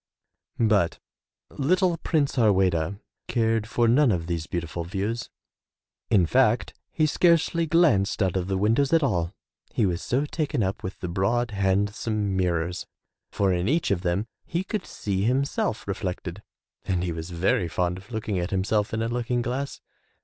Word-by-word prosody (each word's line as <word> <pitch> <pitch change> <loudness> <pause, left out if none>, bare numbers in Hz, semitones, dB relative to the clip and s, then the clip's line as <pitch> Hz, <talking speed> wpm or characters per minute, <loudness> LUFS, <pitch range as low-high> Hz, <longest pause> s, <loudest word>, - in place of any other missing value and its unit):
But 105 -7 +2 0.5
little 180 +5 +2
Prince 155 -3 0
Harweda 95 - +2 0.3
cared 115 -2 +1
for 120 0 +2
none 125 +2 +5
of 85 -4 -1
these 85 -2 -3
beautiful 85 0 -3
views. 100 +7 -3 0.8
In 95 -5 +4
fact, - - +2 0.2
he 155 - +2
scarcely 170 +1 +3
glanced 150 - +3
out 95 -2 0
of 90 -1 -1
the 95 -1 0
windows 115 +9 +2
at 165 -2 +5
all, 90 -10 0 0.4
he 110 - +1
was 90 -2 -1
so 135 +4 0
taken 150 -5 -1
up 95 +1 -2
with 95 - -6
the 90 - -3
broad, 110 +7 0
handsome 100 +1 0
mirrors, 90 -1 -1 0.4
for 100 -2 +1
in 90 +2 0
each 160 -3 +1
of 95 -3 +1
them 90 +3 0 0.2
he 170 +2 -2
could 200 0 -4
see 95 -2 -2
himself 130 -2 0
reflected 95 -1 -4 0.4
and 90 -2 -1
he 90 - -1
was 80 +1 -5
very 90 0 +1
fond 90 +3 -1
of 100 +6 -17
looking 110 -4 -2
at 90 +1 -2
himself 100 +3 0
in 110 - -1
a - - 0
looking 120 +1 -1
glass. 130 +4 -3
100 Hz, 165 wpm, -26 LUFS, 90-125 Hz, 0.8 s, none